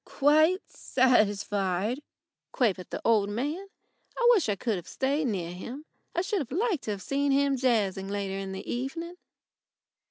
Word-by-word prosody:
"Quite 310 Hz, +6 st, +3 dB
satisfied," 205 Hz, -2 st, +1 dB, 0.5 s
quavered 195 Hz, -8 st, 0 dB
the -, -, -5 dB
old 210 Hz, -3 st, +3 dB
man. 295 Hz, -, -3 dB, 0.5 s
I 485 Hz, -, +3 dB
wish 395 Hz, -, +3 dB
I 205 Hz, -, +1 dB
could 215 Hz, +1 st, -1 dB
have 175 Hz, -, -8 dB
stayed 280 Hz, +2 st, 0 dB
near 180 Hz, -6 st, -2 dB
him. 245 Hz, -, -8 dB, 0.3 s
I 350 Hz, -, +1 dB
should 375 Hz, -, -2 dB
like 380 Hz, -, 0 dB
to -, -, -6 dB
have 200 Hz, -2 st, -5 dB
seen 280 Hz, +4 st, 0 dB
him 275 Hz, 0 st, +3 dB
jazzing 215 Hz, -7 st, +1 dB
later 200 Hz, -1 st, -3 dB
in 195 Hz, -1 st, -5 dB
the 190 Hz, -, -7 dB
evening. 325 Hz, +8 st, -4 dB
250 Hz, 155 wpm, -28 LUFS, 200-295 Hz, 0.5 s, Quite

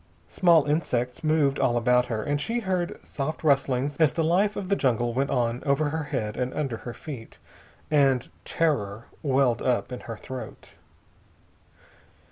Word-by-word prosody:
Small 170 Hz, -5 st, +4 dB
insects 130 Hz, -3 st, -1 dB
moved 155 Hz, -3 st, +2 dB
all 120 Hz, -, +2 dB
about 125 Hz, +1 st, +3 dB
her, 110 Hz, -2 st, -2 dB
and 145 Hz, 0 st, -1 dB
she 235 Hz, +7 st, -1 dB
heard 185 Hz, -4 st, -1 dB
soft 150 Hz, +4 st, -4 dB
rustlings 140 Hz, -1 st, +1 dB
as 155 Hz, -4 st, +4 dB
the 165 Hz, -, 0 dB
life 195 Hz, +6 st, +2 dB
of 195 Hz, -, -4 dB
the 200 Hz, -, +2 dB
jungle 120 Hz, -, +1 dB
went 135 Hz, +3 st, 0 dB
on 120 Hz, -1 st, 0 dB
over 145 Hz, +1 st, +1 dB
her 160 Hz, 0 st, -3 dB
head 105 Hz, -7 st, -3 dB
and 125 Hz, 0 st, -1 dB
under 135 Hz, -7 st, -2 dB
her 120 Hz, -, -7 dB
feet, 130 Hz, -8 st, -9 dB, 0.5 s
and 135 Hz, -4 st, +3 dB, 0.2 s
terror 115 Hz, -9 st, -1 dB, 0.2 s
welled 135 Hz, -4 st, +2 dB
up 125 Hz, 0 st, 0 dB
in 125 Hz, -, -5 dB
her 115 Hz, -2 st, -7 dB
throat. 130 Hz, +3 st, -9 dB
140 Hz, 160 wpm, -26 LUFS, 125-155 Hz, 0.5 s, Small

